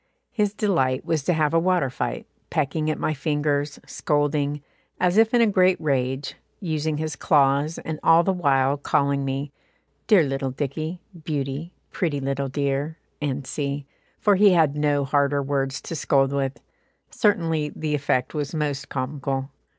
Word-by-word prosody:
His 210 -3 0
delight 140 -12 +1
was 160 -2 0
to 180 - +3
have 155 -2 +1
a 165 - +5
water 175 -6 +1
fight, - - -3 0.2
pecking 155 +1 -1
at 155 - -1
my 155 - -1
fingers, 145 0 -1
scolding, 145 -1 -1 0.4
as 180 0 +2
if 225 +1 +5
in 240 - +4
a - - +6
great 185 -3 +3
rage, 135 -2 -1 0.3
using 155 -4 -2
his 155 -1 -3
claws, 140 +2 +2
and 160 -1 -5
all 165 +1 +5
the 190 - +1
while 140 -5 +2
calling 140 0 +1
me 135 +1 -3 0.6
"Dear 205 -7 +6
little 135 -1 -2
Dicky; 155 +6 -4 0.2
beauty; 145 +2 -3 0.2
pretty 155 -6 -1
little 135 0 -2
dear," 140 +3 -1 0.5
&c., 140 +1 -3 0.3
for 205 -2 +3
he 200 -1 +6
had 155 -4 +3
no 145 -1 +1
harder 140 0 +1
words 135 0 -1
to 165 - -6
scold 135 -2 +2
with; 135 -1 -2 0.5
certainly 165 -7 +1
the 155 -1 -2
effect 140 -3 0
was 150 0 -3
most 145 -2 -2
comical. 135 0 -3
145 Hz, 155 wpm, -24 LUFS, 140-160 Hz, 0.6 s, a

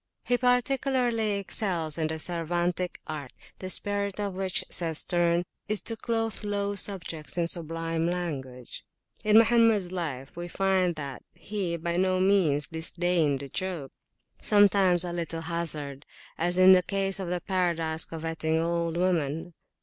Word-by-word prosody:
He 245 - +1
particularly 250 -3 +1
excels 185 -5 -1
in 160 - +1
the 160 0 -3
Cervantic 175 +2 -2
art, 145 -5 -6 0.3
the 185 - -5
spirit 200 +1 -1
of 200 -2 -2
which, 190 0 -2
says 165 -3 -1
Sterne, 175 0 +2 0.2
is 210 0 0
to 225 - -4
clothe 225 -1 -2
low 205 -1 -1
subjects 180 -6 -1
in 170 -1 +1
sublime 165 0 -2
language. 135 -8 -5 0.4
In 210 0 +5
Mohammeds 225 -5 +4
life 145 -7 -4
we 175 +1 -5
find 185 -1 +1
that 140 -4 -6
he 175 -1 -3
by 170 +1 -2
no 185 0 +2
means 185 -7 +3
disdained 160 -3 0
a 140 - -8
joke, 175 -4 -4 0.5
sometimes 195 -4 +5
a 175 -1 -4
little 165 -1 -4
hasarde, 155 -5 +2 0.3
as 175 +2 0
in 185 0 +8
the 185 -1 +7
case 195 +1 -1
of 190 - -4
the 180 0 -1
Paradise 170 -3 0
coveting 160 -1 -2
old 170 0 -1
woman. 170 -2 0
175 Hz, 145 wpm, -27 LUFS, 165-195 Hz, 0.5 s, in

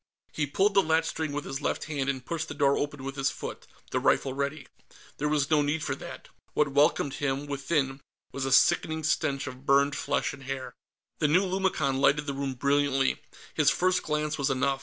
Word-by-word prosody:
He 150 -1 -1
pulled 195 +8 +2
the 195 - +6
latchstring 160 -2 0
with 145 0 -4
his 135 +2 -4
left - - -1
hand 140 -3 -2
and 130 -2 -3
pushed 160 -1 -3
the - - -7
door 140 -1 +3
open 145 -2 -3
with 135 0 -5
his 135 0 +1
foot, - - -7 0.2
the - - +1
rifle 135 - +2
ready. 140 +2 -3 0.5
There 150 - -1
was 150 -1 0
no 150 -1 +5
need 145 +2 -1
for - - -1
that. - - -9 0.3
What 150 -1 +3
welcomed 145 0 +2
him, 140 0 -1
within, 140 -1 -1 0.3
was 135 - -4
a 135 - -1
sickening 160 +4 +3
stench 145 -2 0
of 130 0 -9
burned 140 +1 +4
flesh - - -1
and 140 - -11
hair. 135 -1 -5 0.5
The 150 - +3
new 175 +6 +4
lumicon 185 -8 0
lighted 145 +1 +3
the 140 - -3
room 135 -1 -3
brilliantly; 140 0 +1 0.3
his 150 -2 +4
first 185 +2 +2
glance 150 0 -2
was 140 - +1
enough. 135 +1 +1
145 Hz, 200 wpm, -28 LUFS, 135-155 Hz, 0.5 s, the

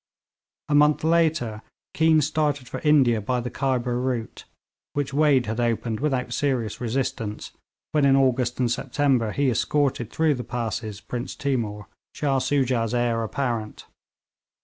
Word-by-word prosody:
A - - -1
month 150 +1 +4
later 155 -10 +1 0.3
Keane 160 -1 +4
started 145 -3 0
for - - -5
India 135 -7 +3
by 125 +4 -1
the 125 +1 -4
Khyber 125 -2 -1
route, 125 -3 -3 0.5
which 145 -1 -2
Wade 145 -4 +3
had 110 +2 -3
opened 115 -1 -1
without 130 -4 -1
serious 125 -7 -1
resistance 120 -3 -3 0.4
when 150 -2 +2
in 135 -1 +5
August 130 -2 +1
and 120 -2 +1
September 130 -4 +1
he 140 +1 +1
escorted 130 -2 0
through 160 +2 +2
the 125 -2 -5
passes 110 -4 -4
Prince 125 +3 -5
Timour, 115 -7 -2 0.3
Shah 140 -2 +1
Soojah's 130 -4 0
heir 120 -1 +1
apparent. 115 -2 -3
125 Hz, 140 wpm, -24 LUFS, 115-145 Hz, 0.5 s, in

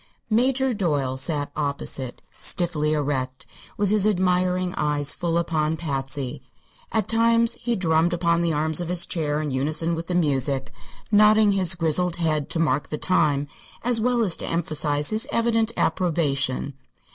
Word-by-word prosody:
Major 260 +3 +2
Doyle 145 - -1
sat 145 +1 -2
opposite, 140 -3 -2
stiffly 160 -4 0
erect, 135 -3 -2 0.3
with 205 -1 0
his 210 -1 +2
admiring 180 -2 +1
eyes 150 -1 0
full 170 -1 -1
upon 160 -2 0
Patsy. 135 -3 -3 0.5
At 220 -3 0
times 230 +1 +3
he 240 0 0
drummed 165 -2 +2
upon 170 -1 +1
the 170 -1 +1
arms 155 +2 0
of 175 - -4
his 175 -1 +1
chair 150 -3 -2
in 150 - -3
unison 155 +5 -1
with 165 0 -4
the 180 - -2
music, 140 -4 0 0.4
nodding 210 0 +5
his 185 -2 +1
grizzled 170 +1 +1
head 155 -4 -1
to - - -2
mark 155 -3 0
the 150 - -3
time 150 -6 +1 0.4
as 240 -1 +1
well 245 0 +2
as 185 -6 0
to - - -5
emphasize 155 -2 -1
his 215 +1 -1
evident 230 -1 +1
approbation. 145 -6 0
165 Hz, 155 wpm, -24 LUFS, 145-190 Hz, 0.5 s, nodding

